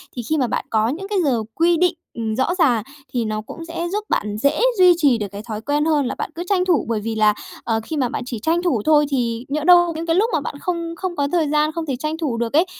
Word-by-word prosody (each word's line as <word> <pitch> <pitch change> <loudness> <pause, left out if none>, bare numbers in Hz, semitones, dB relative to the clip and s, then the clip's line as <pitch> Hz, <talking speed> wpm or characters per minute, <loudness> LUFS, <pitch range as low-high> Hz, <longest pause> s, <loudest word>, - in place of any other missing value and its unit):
Thì 245 - -3
khi 315 - +2
mà 255 -3 +1
bạn - - -2
có 220 0 +2
những 350 +10 -4
cái 415 - -1
giờ 245 -6 +1
quy 340 +1 +3
định, 360 +1 +3 0.2
ừm, 220 -2 -3
rõ 260 +8 0
ràng, 250 - +3 0.3
thì 240 -2 0
nó 215 0 -2
cũng 330 +9 -9
sẽ 335 +1 -4
giúp 420 +2 -2
bạn 210 0 -1
dễ 280 +6 +1 0.2
duy 365 -1 +7
trì 280 -7 +3
được 210 -2 -3
cái 200 - -7
thói 215 -1 -4
quen 295 +4 0
hơn 300 -3 +2
là - - -3
bạn - - -3
cứ 345 - -4
tranh 365 -2 +2
thủ, 350 -6 +2
bởi 225 -2 0
vì 225 +1 -4
là, 215 -1 +4 0.3
ờ, 225 -1 0
khi 315 - -5
mà 255 -3 +1
bạn - - -4
chỉ 245 -3 -5
tranh 330 +9 +1
thủ 280 - +1
thôi 300 -1 +5
thì 240 -3 -1
nhỡ 295 +1 -1
đâu 350 0 +6
những 325 - -4
cái 330 0 +1
lúc 425 +5 +3
mà 310 - +1
bạn 280 - -5
không 335 -2 -3
không 365 0 -4
có 285 -2 0
thời 325 -4 +1
gian, 300 +1 +2
không 330 0 -4
thể 270 -4 -2
tranh 305 +5 -3
thủ 285 -8 -2
được 235 +1 -2
ấy, 320 +5 +4
295 Hz, 290 wpm, -21 LUFS, 235-335 Hz, 0.3 s, duy